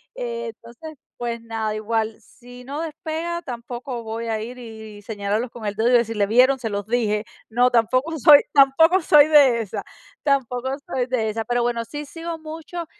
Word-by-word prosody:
Eh, 235 -1 -4
entonces 240 +8 -12 0.2
pues 235 -1 -4
nada, 225 -2 -3
igual, 220 0 -2
si 245 +2 -15
no 280 +4 -6
despega, 325 +2 -4
tampoco 240 -1 -6
voy 225 +1 -5
a 220 -1 -1
ir 240 +3 -7
y 220 -3 -10
señalarlos 210 +3 -3
con 230 -3 -9
el 205 - -2
dedo 225 +3 +2
y - - +2
decirles, 225 -4 +2
¿vieron? 255 +3 +4
Se 225 - -3
los 200 -1 -3
dije. 220 -3 0 0.2
No, 245 +3 +3
tampoco 255 +7 +1
soy 290 +2 +9
tampoco 320 +6 +5
soy 300 -2 +6
de 280 -6 +5
esas, 210 - -5 0.4
tampoco 260 -3 0 0.2
soy 250 -1 -2
de 230 -4 0
esas. 225 +1 -3
Pero, 240 0 +1
bueno, 235 -1 -1
sí 295 +6 -7
sigo 330 +2 -6
mucho, 320 +2 -7
240 Hz, 180 wpm, -22 LUFS, 225-280 Hz, 0.4 s, soy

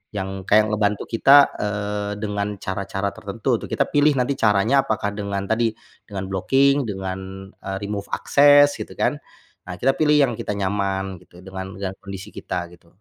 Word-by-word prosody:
yang 95 -1 -3 0.2
kayak 110 +1 +4
ngebantu 105 -1 0
kita, 140 +5 +6
eee, 105 0 -2
dengan 105 -1 -2
cara-cara 95 +1 -3
tertentu 105 +1 -5
tuh - - -8
kita - - +1
pilih 145 +1 +4
nanti 130 +1 +1
caranya 110 +6 +3
apakah 105 -2 -1
dengan 100 -1 -3
tadi, 115 0 +1 0.3
dengan 100 -2 -5
blocking 135 +8 +2
dengan, 95 0 -6 0.2
eee, 95 0 -3
remove 100 0 -4
access 145 0 +5
gitu - - -7
kan. - - 0 0.5
Nah 90 - -5
kita 135 - +4
pilih 150 -1 +4
yang 140 -4 +4
kita - - -3
nyaman 95 -1 -2
gitu 90 0 -17
dengan 95 0 -7
dengan 95 -1 -4
kondisi 95 -1 -8
kita 85 0 -5
gitu. 85 -1 -19
100 Hz, 165 wpm, -22 LUFS, 95-115 Hz, 0.5 s, kita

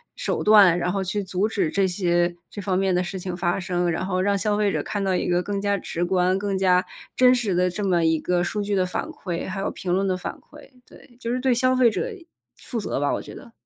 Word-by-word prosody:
手 - - -2
段， 200 -5 +7
然 180 0 -1
后 195 0 -1
去 195 +2 -2
阻 190 +3 -1
止 205 -7 -1
这 195 -1 +2
些 175 -1 +1 0.2
这 205 - -6
方 185 -2 0
面 190 0 +1
的 180 0 +1
事 190 +2 -5
情 180 -1 -5
发 175 +1 0
生， 180 -1 -1
然 170 +2 -2
后 185 -1 -1
让 200 +1 +1
消 210 +1 0
费 210 -1 +2
者 - - -2
看 205 -1 -3
到 190 -1 +1
一 - - -1
个 175 0 +2
更 200 +2 -3
加 200 0 0
直 175 0 -3
观、 185 +1 +2
更 200 0 -2
加 185 -1 +3 0.3
真 255 0 +6
实 220 -7 0
的 180 +1 +2
这 200 +4 -4
么 175 -4 +2
一 160 -1 +2
个 175 +1 0
数 205 +4 -2
据 205 0 -1
的 185 -1 +2
反 180 - -3
馈、 185 - -5
还 195 +1 -4
有 195 - -2
评 180 - -5
论 195 +2 +1
的 185 - +1
反 185 - -5
馈， 295 -2 -16
对， 240 -3 -18
就 235 -1 -3
是 255 - -1
对 260 0 +1
消 255 +2 +2
费 255 -2 +5
者 475 - -3 0.4
负 240 - -5
责 200 - -3
吧， 145 - +1
我 - - -2
觉 - - -11
得。 255 -4 -12
190 Hz, 285 characters per minute, -24 LUFS, 180-205 Hz, 0.4 s, 段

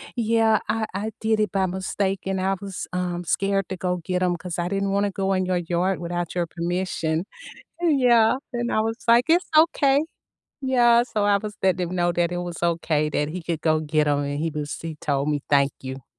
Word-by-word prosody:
"Yeah, 225 -2 +3
I 225 -1 0
I 210 +3 -3
did 220 -1 +1
it 210 -4 0
by 190 -1 +1
mistake 190 +1 -2
and 190 0 -1
I 190 +1 +1
was, 195 -2 -6
um, 180 -1 -2
scared 195 +2 0
to - - -1
go 180 0 -1
get 185 0 0
'em, 175 -1 +1
'cause 180 0 -6
I 175 0 -1
didn't 195 0 -1
wanna 200 +1 +1
go 195 0 -1
in 185 -1 +1
your 180 -1 0
yard 175 +2 -1
without 175 0 -3
your 175 -1 0
permission." 170 -1 -2 0.5
And, 320 -6 +2
yeah, 235 -2 +5 0.2
and 240 0 -2
I 215 - +2
was 225 +1 -2
like, 235 +1 +5
"It's 345 +2 +3
okay." 290 -3 +4 0.6
Yeah. 240 -3 +4
So, 215 -4 -1
I 205 -1 +4
was 210 +1 -6
letting 185 -2 +1
him 185 - -4
know 175 0 +2
that 175 0 +1
it 175 - -2
was 175 -1 -5
okay 160 -3 +1
that 145 0 -1
he 175 +1 -6
could 165 -2 -3
go 155 -1 +2
get 155 -1 +1
'em, 145 -1 +2
and 145 +1 -3
he 165 +1 0
was 150 -1 -4
he 165 -2 -5
told 140 0 -1
me 145 -1 0
"thank 140 -1 +4
you." 130 -1 -7
185 Hz, 220 wpm, -24 LUFS, 170-215 Hz, 0.6 s, yeah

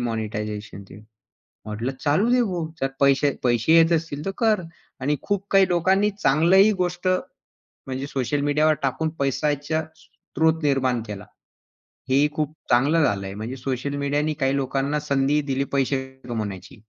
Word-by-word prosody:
"मॉनिटायझेशनचे." 105 -3 -5 0.7
म्हटलं, 110 +5 -3
"चालू 160 +11 +2
देऊ 245 -2 +3
भाऊ, 170 -2 -2
जर 135 - +1
पैसे 140 +1 +4
पैसे 120 +4 +2
येत 165 0 +5
असतील 155 -3 -2
तर - - 0
कर." 215 -5 +2 0.4
आणि 145 +3 0
खूप 200 -1 -2
काही 195 -1 +5
लोकांनी 190 +4 +2
चांगलंही 190 +2 +4
गोष्ट 180 +1 -2 0.8
म्हणजे 130 +1 -4
सोशल 140 +1 -1
मीडियावर 150 +2 +3
टाकून 155 +4 0
पैशाचा 145 +3 0
स्त्रोत 160 0 -2
निर्माण 130 -4 +1
केला. 105 -1 -7 0.8
हे 130 - +3
ही 145 +2 +4
खूप 150 -1 -2 0.2
चांगलं 145 +7 +3
झालं 100 -7 0
आहे. 95 - -6
म्हणजे 110 +5 -5
सोशल 135 +2 -3
मीडियानी 145 +2 0
काही 135 +1 +2
लोकांना 140 +2 -1
संधीही 140 0 +1
दिली 135 +1 0
पैसे 135 0 +1 0.3
कमवण्याची. 105 +1 -5
140 Hz, 145 wpm, -23 LUFS, 130-160 Hz, 0.8 s, येत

